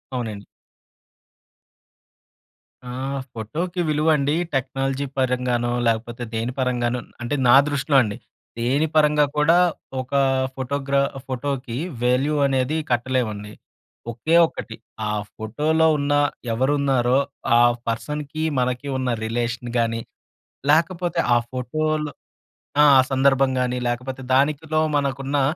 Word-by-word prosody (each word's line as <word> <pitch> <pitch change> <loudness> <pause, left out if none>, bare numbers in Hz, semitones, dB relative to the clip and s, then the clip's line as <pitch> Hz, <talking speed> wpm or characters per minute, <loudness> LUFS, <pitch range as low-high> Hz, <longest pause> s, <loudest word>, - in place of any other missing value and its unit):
అవునండి. 110 -5 -4 2.4
ఆహ్, 135 +2 -3
ఫోటోకి 165 - -3
విలువండీ 150 -1 +2 0.2
టెక్నాలజీ 135 +1 -1
పరంగానో, 125 -2 0 0.2
లేకపోతే 115 +1 -1
దేని 115 +2 -2
పరంగానో 125 -1 0 0.2
అంటే, 120 +4 -2
నా 120 - +8
దృష్టిలో 145 0 0
అండి. 105 -3 -4 0.4
దేని 135 +7 +1
పరంగా 150 -1 +4
కూడా 150 +3 +4 0.4
ఒకా 140 +2 0 0.3
ఫోటోగ్రా 140 +1 0 0.3
ఫోటోకి 130 -2 -3 0.3
వాల్యూ 130 +4 +2
అనేది 135 +2 +1
కట్టలేమండి. 120 -4 -1 0.6
ఒకే 140 +8 0
ఒక్కటి, 115 -7 -8 0.3
ఆ - - 0 0.2
ఫోటోలో 150 +9 +1
ఉన్న, 145 0 0 0.4
ఎవరున్నారో 130 0 +2 0.4
ఆ - - +6 0.3
పర్సన్‌కి, 150 +6 -4 0.2
మనకి 125 +2 -1
ఉన్న 130 -1 -1 0.2
రిలేషన్ 120 +1 -3
గానీ, 115 0 0 0.7
లేకపోతే 170 +2 +1 0.2
ఆ - - +5
ఫోటోలు 150 +4 -2 0.7
ఆ! - - +7
ఆ - - +9
సందర్భం 135 0 +3
గానీ, 125 0 0
లేకపోతే 125 +2 -4
దానికిలో 150 +3 +1 0.2
మనకున్నా 140 0 -1
135 Hz, 105 wpm, -22 LUFS, 120-145 Hz, 2.4 s, ఆ